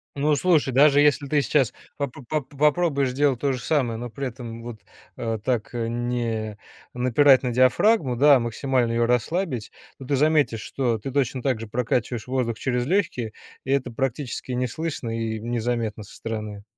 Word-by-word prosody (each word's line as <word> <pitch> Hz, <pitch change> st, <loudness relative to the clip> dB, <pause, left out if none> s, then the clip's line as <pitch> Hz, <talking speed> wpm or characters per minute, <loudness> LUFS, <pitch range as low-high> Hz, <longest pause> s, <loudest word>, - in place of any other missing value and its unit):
Ну, 145 Hz, +1 st, +2 dB
слушай, 155 Hz, -4 st, +2 dB
даже 145 Hz, +1 st, +6 dB
если 145 Hz, -1 st, +3 dB
ты 145 Hz, 0 st, +2 dB
сейчас 135 Hz, -4 st, +1 dB, 0.2 s
поп 140 Hz, -4 st, -3 dB
поп 130 Hz, -4 st, -13 dB
поп 145 Hz, -2 st, -4 dB
попробуешь 150 Hz, -3 st, +2 dB
сделать 135 Hz, -1 st, +1 dB
то 140 Hz, -1 st, +1 dB
же 125 Hz, -, -3 dB
самое, 125 Hz, -7 st, 0 dB
но 120 Hz, 0 st, -5 dB
при 135 Hz, +3 st, -4 dB
этом 115 Hz, -2 st, -8 dB
вот, 120 Hz, -3 st, -8 dB, 0.4 s
э, 115 Hz, -1 st, -2 dB
так 120 Hz, -4 st, -1 dB
не 115 Hz, -2 st, -2 dB, 0.4 s
напирать 130 Hz, +2 st, +4 dB
на 125 Hz, -, -1 dB
диафрагму, 130 Hz, -, +3 dB
да, 140 Hz, +3 st, +6 dB
а -, -, 0 dB
максимально 120 Hz, +1 st, 0 dB
её 115 Hz, 0 st, +2 dB
расслабить, 125 Hz, -, -1 dB, 0.3 s
то 135 Hz, -, -9 dB
ты 140 Hz, +2 st, 0 dB
заметишь, 145 Hz, -5 st, +2 dB
что 120 Hz, -1 st, -1 dB
ты 135 Hz, +6 st, -6 dB
точно 130 Hz, -2 st, -1 dB
так 130 Hz, -5 st, 0 dB
же 115 Hz, -, -6 dB
прокачиваешь 120 Hz, 0 st, -1 dB
воздух 125 Hz, -3 st, -1 dB
через 125 Hz, -2 st, -1 dB
лёгкие, 145 Hz, -, -1 dB, 0.3 s
и 130 Hz, -, -3 dB
это 130 Hz, -3 st, 0 dB
практически 130 Hz, +1 st, -3 dB
не 125 Hz, 0 st, 0 dB
слышно 155 Hz, -3 st, -4 dB
и 110 Hz, -1 st, -2 dB
незаметно 115 Hz, -2 st, -2 dB
со -, -, -14 dB
стороны. 105 Hz, -2 st, -5 dB
125 Hz, 180 wpm, -24 LUFS, 115-140 Hz, 0.4 s, даже